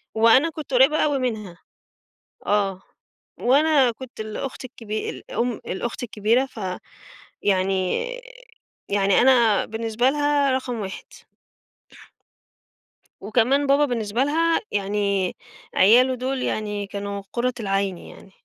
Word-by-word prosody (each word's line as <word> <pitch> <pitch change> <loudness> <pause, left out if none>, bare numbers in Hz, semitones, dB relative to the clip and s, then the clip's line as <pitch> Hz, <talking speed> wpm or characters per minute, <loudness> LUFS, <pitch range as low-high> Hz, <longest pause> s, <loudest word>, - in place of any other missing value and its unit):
وأنا 230 +8 +5
كنت 305 -4 -8
قريّبة 270 +5 +5
أوي 285 -2 0
منها 215 -8 -4 0.9
آه. 195 -2 0 0.6
وأنا 275 0 +4
كنت 245 0 -12
الأخت 220 +5 -5
الكبي 215 -3 -5
الأم 240 0 -3
الأخت 235 +6 -4
الكبيرة 230 +3 +1
ف 240 - -12 0.8
يعني 190 - +1 0.8
يعني 200 -1 +3
أنا 240 -5 +4
بالنسبة 225 +3 0
لها 290 -1 +1
رقم 255 -3 -2
1. 190 -1 -6 2.2
وكمان 250 +7 +1
بابا 285 +2 +4
بالنسبة 230 -1 -1
لها 330 +3 +2
يعني 200 -2 -1 0.4
عياله 250 +6 +5
دول 255 +1 -3
يعني 210 -2 -3
كانوا 200 0 -5
قُرّة 250 +1 0
العين 195 -3 -1
يعني، 195 - -14
230 Hz, 105 wpm, -23 LUFS, 205-265 Hz, 2.2 s, وأنا